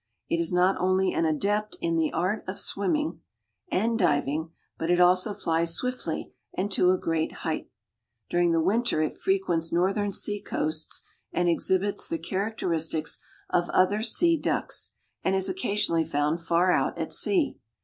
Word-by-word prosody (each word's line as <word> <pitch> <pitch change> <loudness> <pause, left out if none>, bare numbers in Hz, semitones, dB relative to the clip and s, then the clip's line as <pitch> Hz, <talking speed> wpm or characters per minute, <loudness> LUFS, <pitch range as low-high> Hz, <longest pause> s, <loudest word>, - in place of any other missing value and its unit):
It 170 - +1
is 165 -1 0
not 180 +2 +3
only 185 +1 +2
an 165 - +1
adept 205 +7 0
in 165 0 -1
the 160 -1 +1
art 185 +6 -1
of 185 - -4
swimming 300 +11 0 0.5
and 225 +4 +1
diving, 150 -2 +1 0.3
but 165 - -2
it 175 0 +3
also 180 +3 +4
flies 165 -3 +1
swiftly 250 0 -3 0.2
and 200 +2 -1
to 180 -1 +3
a 185 - +4
great 165 -2 -1
height. - - -2 0.6
During 175 -1 +2
the 165 - +2
winter 205 -3 +1
it 155 - -4
frequents 180 -4 0
northern 195 +4 +1
sea 205 +1 -1
coasts 155 0 -1 0.3
and 175 0 0
exhibits 190 +4 +1
the 165 - -2
characteristics 165 -4 -1 0.3
of 175 0 +1
other 200 +3 +2
sea 330 +9 +3
ducks, - - -2 0.3
and 190 - +1
is 190 0 +1
occasionally 205 - 0
found 150 +3 -1
far 170 +2 +2
out - - +1
at - - -3
sea. 355 -7 +2
180 Hz, 160 wpm, -27 LUFS, 165-205 Hz, 0.6 s, also